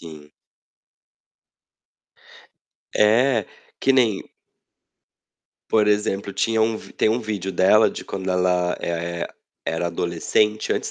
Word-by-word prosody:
Sim. 75 -3 -12 2.7
É, 115 +1 +3 0.3
que 135 - +3
nem 115 -7 +2 1.5
por 105 -1 +3
exemplo, 105 -1 0
tinha 115 +2 0
um 110 0 0
tem - - -1
um 115 +3 +1
vídeo 105 -4 -4
dela 95 +5 +4
de - - -8
quando 95 -1 -4
ela, 90 -1 +1
eh, 85 0 -3 0.4
era 80 +1 -1
adolescente, 85 +5 0
antes - - -3
100 Hz, 105 wpm, -22 LUFS, 85-110 Hz, 2.7 s, dela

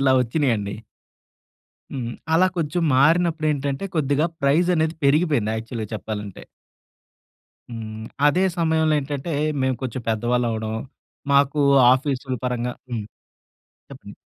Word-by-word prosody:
ఇలా 135 -1 +4
వచ్చినయండి. 115 -6 0 1.2
హ్మ్. 120 -3 -4 0.2
అలా 185 +3 +5
కొంచెం 165 +1 -1
మారినప్పుడేంటంటే 155 -1 +2
కొద్దిగా 145 +2 +2 0.2
ప్రైస్ 155 +6 +3
అనేది 160 0 0
పెరిగిపోయింది 140 -7 +2
యాక్చువల్‌గా 110 -1 -5
చెప్పాలంటే. 105 -2 -6 1.3
హ్మ్. 110 -1 -7 0.2
అదే 180 +6 +3 0.2
సమయంలో 160 -1 +2
ఏంటంటే 145 +3 -4 0.3
మేము 130 -1 +1
కొంచెం 130 -1 -4
పెద్దవాళ్ళవ్వడం, 115 -1 0 0.6
మాకు 140 +1 +3 0.3
ఆఫీసుల 130 -1 -1
పరంగా 125 0 -1 0.2
హ్మ్. 110 -3 -3 0.9
చెప్పండి. - - -11
135 Hz, 100 wpm, -22 LUFS, 115-155 Hz, 1.3 s, అలా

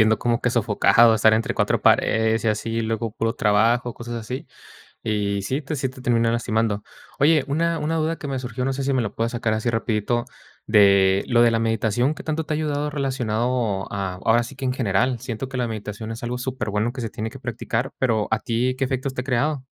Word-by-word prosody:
sintiendo, 110 0 +3
como 120 0 0
que 125 - +1
sofocado, 115 0 +4
estar 110 0 +4
entre 110 +1 +1
4 - - +1
paredes 110 0 +3
y - - +3
así. 110 +1 -1
Y 115 0 -1
luego 110 0 -2
puro 115 +2 -1
trabajo, 115 +3 +2
cosas 120 0 -7
así, 115 +3 -6 0.5
y 100 -2 -1
sí 130 +9 -2
te 155 +2 -5
sí 135 -2 -1
te 130 +1 -12
termina 115 -2 +2
lastimando. 110 -3 0 0.3
Oye, 150 0 +4
una 165 +2 0
una 160 +2 -1
duda 160 +1 0
que 145 - -7
me 135 -1 -2
surgió, 125 0 -4
no 135 - 0
sé 135 0 -3
si 140 - +1
me 130 - +2
lo 105 -2 -4
puedas 115 +2 -1
sacar 115 -2 0
así 110 +2 0
rapidito, 115 +1 -1 0.4
de 100 -2 +5
lo 120 -1 +4
de 120 - +5
la 115 - +1
meditación, 115 +4 +1
¿qué - - -9
tanto 160 0 -2
te 155 - -1
ha - - 0
ayudado 150 -1 -1
relacionado 120 -7 -1
a, 95 -2 -3
ahora 115 +1 +4
sí 135 - -9
que 135 +1 -7
en 125 - +1
general? 120 +1 +1
Siento 120 +3 -5
que 135 - -6
la 125 - 0
meditación 110 0 -6
es 115 - -8
algo 120 +1 -3
superbueno 120 -3 -2
que 130 - -7
se 115 -3 -4
tiene 110 - -4
que 135 - -11
practicar, 120 +2 -3
pero 110 -5 +1
a 110 - +2
ti, 120 +3 -1
¿qué 135 - +1
efectos 130 +1 -2
te 125 - -2
ha - - -13
creado? 135 +1 0
120 Hz, 230 wpm, -23 LUFS, 110-130 Hz, 0.5 s, de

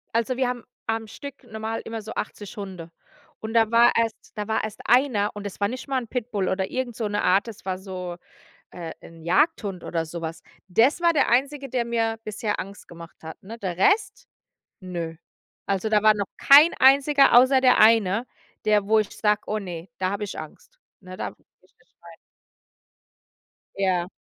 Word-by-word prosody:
Also, 230 +2 +1
wir 260 -1 +1
haben 245 -2 -5 0.2
am 225 0 -2
Stück 280 +5 -10
normal 220 -1 -5
immer 225 0 -5
so 215 +1 -8
80 205 +1 -6
Hunde. 185 -5 -8 0.5
Und 220 0 -6
da 225 -1 +3
war 235 +1 +6
erst 230 -1 -2
da 210 -1 -4
war 220 - 0
erst 215 - -6
einer 240 -4 +3
und 205 0 -6
es 200 - -10
war 200 - +2
nicht 255 +6 -7
mal 270 -1 0
'n 235 - -9
Pitbull 215 -5 -2
oder 190 0 -1
irgend 255 -2 -3
so 220 -2 -2
'ne 205 0 -2
Art, 190 +5 +3
es 220 -5 -10
war 185 -1 -2
so, 180 -2 -6 0.5
äh, 170 -2 -7
'n 165 -1 -14
Jagdhund 195 - +1
oder 165 -1 -2
so 170 +1 -7
was. 165 0 -6 0.3
Des 230 - +3
war 340 -1 +4
der 305 - +2
Einzige, 275 +3 0
der 240 -1 -1
mir 225 -1 -1
bisher 215 0 -3
Angst 200 +2 -8
gemacht 170 0 -12
hat, 160 0 -9
ne? 220 +4 -9
Der 185 -6 -4
Rest, 405 - +1 0.5
ne. 170 -3 -6 0.5
Also, 200 +2 -1
da 210 -1 +3
war 215 0 +7
noch 200 -2 -2
kein 295 +5 +7
Einziger, 275 0 +6
außer 260 +1 +4
der 255 -1 +5
eine, 220 +1 +4 0.4
der 210 -2 +2
wo 220 +1 +4
ich 215 - -1
sage: 210 -1 +2
„Oh 215 - -1
ne, 175 -3 -7
da 185 0 0
habe 200 +1 -3
ich 200 - -8
Angst.“, - - -12 0.2
ne? 185 -1 -10
„Da - - -3
gehe - - -27 0.2
ich - - -28
nicht - - -32
rein.“ - - -13 1.6
Ja. 185 -3 0
215 Hz, 195 wpm, -24 LUFS, 190-240 Hz, 1.6 s, war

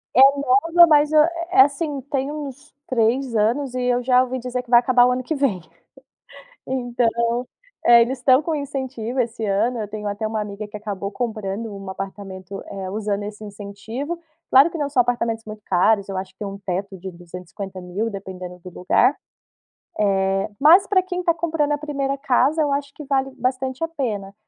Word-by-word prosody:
É - - +5 0.2
nova, 325 +6 +5
mas 300 -1 +4
é - - +5 0.3
é, 390 +1 +7
assim, 290 -2 +1
tem 275 0 -1
uns 295 0 -8
3 245 +1 +1
anos 245 +5 +1
e 250 - -1
eu 245 0 +1
já 250 0 +4
ouvi 260 0 -4
dizer 250 0 -4
que 245 - -22
vai 240 -1 +7
acabar 245 0 +4
o 250 - +3
ano 250 +1 -1
que 310 +6 -2
vem, 270 -11 0 1.1
então, 240 -1 0 0.4
é, 235 0 +8
eles 250 +3 -2
estão 260 +2 +4
com 320 +1 -2
incentivo 265 -4 -4
esse 230 -2 -1
ano, 220 +5 +1
eu 215 -2 -4
tenho 210 0 -6
até 205 +2 -2
uma 215 0 -2
amiga 210 0 -7
que 210 - -8
acabou 200 -2 -5
comprando 215 -2 -4
um 195 -1 -9
apartamento, 195 0 -7
eh 190 -1 -6
usando 205 0 -2
esse 210 +1 -8
incentivo, 215 +10 -6 0.3
claro 275 +5 +7
que 335 - -6
não 290 -3 -2
só 270 -3 +3
apartamentos 230 -2 0
muito 215 0 -9
caros, 200 +2 +2
eu 190 - -3
acho 190 - -6
que - - -67
tem 210 - -3
um 195 0 -8
teto 195 0 -4
de 190 +2 -7
250.000 180 +3 -6
dependendo 185 -3 -8
do 180 - -11
lugar, 180 - +2 1.1
eh, 195 0 0
mas 335 +7 +7
pra 380 -2 +3
quem 360 -1 -4
tá 340 - +3
comprando 315 -3 -1
a - - 0
1ª 280 -2 -2
casa 275 +3 +2
eu 295 -2 +1
acho 280 0 -2
que 300 - -9
vale 270 -1 0
bastante 260 +3 -2
a - - +1
pena, 215 -11 -4
240 Hz, 190 wpm, -22 LUFS, 205-275 Hz, 1.1 s, é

